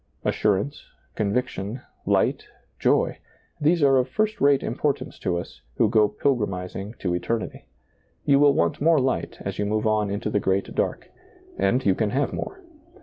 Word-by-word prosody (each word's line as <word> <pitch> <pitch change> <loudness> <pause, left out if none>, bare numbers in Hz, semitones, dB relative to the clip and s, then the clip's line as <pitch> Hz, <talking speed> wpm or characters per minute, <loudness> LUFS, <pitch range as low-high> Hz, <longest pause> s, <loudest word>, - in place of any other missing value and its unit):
Assurance, 105 +8 0 0.3
conviction, 110 +1 -2 0.3
light, - - +2 0.3
joy; - - +2 0.4
these 155 +2 +3
are 135 -1 +5
of 130 0 +1
first 215 +9 -1
rate 140 -1 +4
importance 145 -2 -2
to 90 -1 -1
us, 85 - -8
who 115 - +3
go 105 0 +4
pilgrimizing 105 -4 -2
to 90 -3 -2
eternity. 110 +6 -3 0.6
You 140 -1 +5
will 145 -1 +5
want 85 +7 +1
more 165 +1 +5
light 130 0 -1
as - - -5
you 105 - +1
move 110 +1 0
on 105 -1 +2
into 105 +2 -2
the 105 - +2
great 95 0 0
dark; - - -2 0.4
and 110 +7 +1
you 95 - +5
can 105 +2 0
have 135 +5 0
more. 385 0 -5
110 Hz, 160 wpm, -24 LUFS, 100-140 Hz, 0.6 s, are